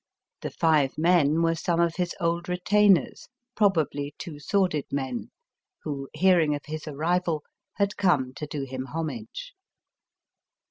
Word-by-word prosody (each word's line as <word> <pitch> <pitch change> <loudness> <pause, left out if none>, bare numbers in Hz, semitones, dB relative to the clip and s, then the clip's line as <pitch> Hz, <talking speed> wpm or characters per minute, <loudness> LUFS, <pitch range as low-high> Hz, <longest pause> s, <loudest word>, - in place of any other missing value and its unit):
The - - -3
five 155 -5 +2
men 165 -1 +3
were 165 0 +3
some 170 +1 -1
of 170 0 +1
his 180 -1 -1
old 170 +1 -1
retainers, 195 +1 +3 0.3
probably 155 -8 +1
two 155 -5 -8
sworded 180 -2 +1
men, 140 - -3 0.5
who, 140 -3 -4
hearing 175 -5 +4
of 145 - -8
his 155 0 -6
arrival, 160 +1 0 0.3
had 200 -1 0
come 145 -10 +2
to 150 - -5
do 145 -1 -4
him 130 -1 -5
homage. 230 - -5
165 Hz, 135 wpm, -26 LUFS, 150-180 Hz, 0.5 s, hearing